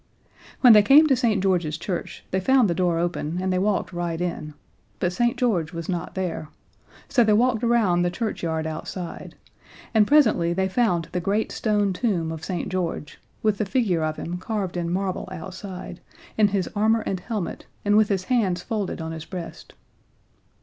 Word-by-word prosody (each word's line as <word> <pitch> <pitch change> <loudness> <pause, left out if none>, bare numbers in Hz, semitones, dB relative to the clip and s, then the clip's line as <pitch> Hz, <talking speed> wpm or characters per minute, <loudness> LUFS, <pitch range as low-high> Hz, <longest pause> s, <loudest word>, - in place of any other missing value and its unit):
When 245 -3 +9
they 210 - +8
came 280 +9 +7
to 280 -3 +4
St. 225 -6 +1
George's 175 -5 +1
Church 175 +1 -5
they 190 - +1
found 260 +3 +4
the 175 - +1
door 175 -1 +1
open, 170 -1 -2
and 185 0 0
they 180 - +1
walked 195 -1 0
right 170 -1 -3
in 160 -4 -4 0.4
but 180 -1 0
St. 240 +5 +1
George 190 - 0
was 165 -1 -5
not 175 -2 -4
there, 180 -4 -3 0.6
so 250 -4 +3
they 215 -1 +3
walked 235 +1 +2
around 225 -7 +3
the 175 - +2
churchyard 170 -5 -3
outside, 165 +2 -6 0.6
and 215 -2 +4
presently 220 - +4
they 190 +1 0
found 190 -5 0
the 180 - -1
great 205 +4 0
stone 205 -3 +1
tomb 180 -6 -1
of 160 -1 -7
St. 180 0 -3
George, 175 -5 -3 0.2
with 215 -2 +1
the - - +2
figure 195 -9 +1
of 155 0 -1
him 175 +2 -5
carved 200 -3 -3
in 170 -1 -2
marble 185 0 -2
outside, 185 0 -8 0.3
in 215 -1 +4
his 195 -3 -1
armor 220 +2 +3
and 190 -3 -3
helmet, 210 -2 -5 0.2
and 205 0 +3
with 215 -1 +4
his 195 -3 0
hands 185 -6 0
folded 210 -6 -3
on 160 0 -4
his 160 -1 -7
breast. 180 -3 -8
185 Hz, 185 wpm, -24 LUFS, 175-215 Hz, 0.6 s, When